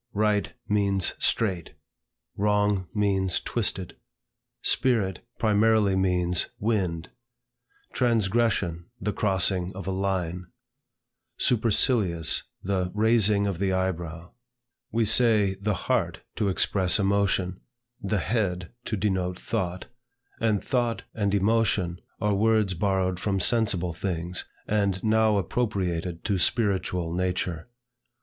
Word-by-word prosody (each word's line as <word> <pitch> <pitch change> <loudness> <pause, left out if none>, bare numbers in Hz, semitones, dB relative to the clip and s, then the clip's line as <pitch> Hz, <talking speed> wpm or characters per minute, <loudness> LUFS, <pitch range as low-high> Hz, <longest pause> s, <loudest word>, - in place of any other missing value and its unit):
Right 105 0 +1 0.2
means 100 -3 +1
straight; 95 -7 0 0.6
wrong 105 -2 +1
means 95 -3 +1
twisted. 100 -6 -2 0.7
Spirit 110 -7 +1
primarily 110 -2 +3
means 90 -1 +1
wind; 95 -7 -1 0.8
transgression, 105 -7 +1
the 105 +2 -2
crossing 95 -2 +1
of 95 - -7
a 95 - -2
line; 90 -2 -2 0.9
supercilious, 110 - +3 0.2
the 95 -1 -1
raising 105 -2 +3
of 95 -4 -2
the 95 -1 +1
eyebrow. 85 -3 -3 0.6
We 115 0 +1
say 110 -3 +4
the 105 0 0
heart - - 0 0.2
to 105 -3 +1
express 95 -1 +2
emotion, 95 -2 0 0.4
the 100 +1 -1
head 90 -5 -1
to 110 - -2
denote 95 -2 -1
thought; 95 -5 -3 0.5
and 110 -3 +1
thought 120 -3 -1
and 100 -2 0
emotion 100 -4 +1 0.2
are 105 0 +1
words 110 -1 +2
borrowed 95 0 0
from 95 0 -1
sensible 95 -5 +2
things, 90 0 -3 0.2
and 100 -3 0
now 110 -1 +3
appropriated 90 -5 -2
to 100 -3 0
spiritual 90 -4 0
nature. 90 -1 -2
100 Hz, 105 wpm, -26 LUFS, 90-105 Hz, 0.9 s, say